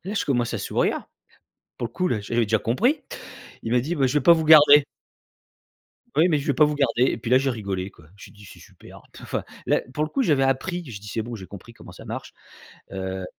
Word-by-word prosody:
Là, 200 +3 -5
je - - -1
commence 120 -4 -1
à - - -2
sourire. - - -1 0.7
Pour 120 - -3
le - - -29
coup, 180 +5 -1
là 110 - -1
j'avais 115 +3 -1
déjà 110 +1 +2
compris. 235 - 0 0.6
Il 115 - -4
m'a 125 - +3
dit: 155 +8 -3
«Bah, 135 - +2
je 130 - -2
vais 140 - -4
pas 170 - +7
vous 160 -1 +1
garder» 150 -2 +8 1.3
«oui, 165 +4 +4
mais 155 - +2
je 145 - -4
vais 145 - +2
pas 145 +3 +4
vous 150 - -2
garder» 130 -4 +1
et - - -3
puis 115 0 -6
là, 130 - +6
j'ai 135 +1 -1
rigolé 100 -6 -4
quoi. 85 - -20
J'ai 105 - -14
dit: 105 0 -16
«C'est - - -14
super», - - -16
p - - -14
te - - -13
enfin, - - -4 0.2
là, - - +2
pour 150 - 0
le 155 - -7
coup, 275 - 0
j'avais 150 - +2
appris. 135 +7 -1
J'ai 115 -6 -8
dis: 105 - -11
«C'est 110 - -3
bon, 120 +2 -7
j'ai 95 -4 -9
compris 100 +5 -12
comment - - -14
ça - - -13
marche», - - -7 0.6
heu 95 0 -5
130 Hz, 255 wpm, -23 LUFS, 110-150 Hz, 1.3 s, garder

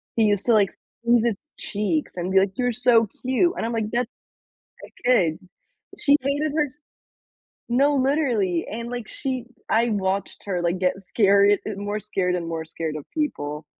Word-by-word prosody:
He 225 - +4
used 205 -2 +1
to, 235 - +4
like, 205 -3 +4
squeeze 235 -1 0
its 235 +7 -3
cheeks 210 +10 -2
and 180 +1 -2
be 190 - +6
like, 195 +3 0
"You're 245 -1 +1
so 235 -1 +4 0.2
cute," 260 +8 +2
and - - -1
I'm 235 - -2
like, 220 -2 -1
"That 240 0 0 0.8
a - - -18 0.2
kid." 175 -11 +3 0.6
She 285 0 +4
hated 285 +2 0
her 300 - +3
s 295 +2 -13 0.9
No, 275 +4 +3
literally 255 - +1
and, 230 +2 -5
like, 240 -3 -5
she 260 -3 -4 0.2
I 230 +1 +3
watched 195 -1 -2
her, 180 -3 -1
like, 175 +1 0
get 185 +1 +1
scared 200 0 +4
and 205 -2 -4
more 205 +1 -2
scared 190 -4 -1
and 170 -2 -4
more 165 -1 -3
scared 160 -1 -4
of 150 - -8
people 150 - -3
215 Hz, 185 wpm, -24 LUFS, 190-250 Hz, 0.9 s, be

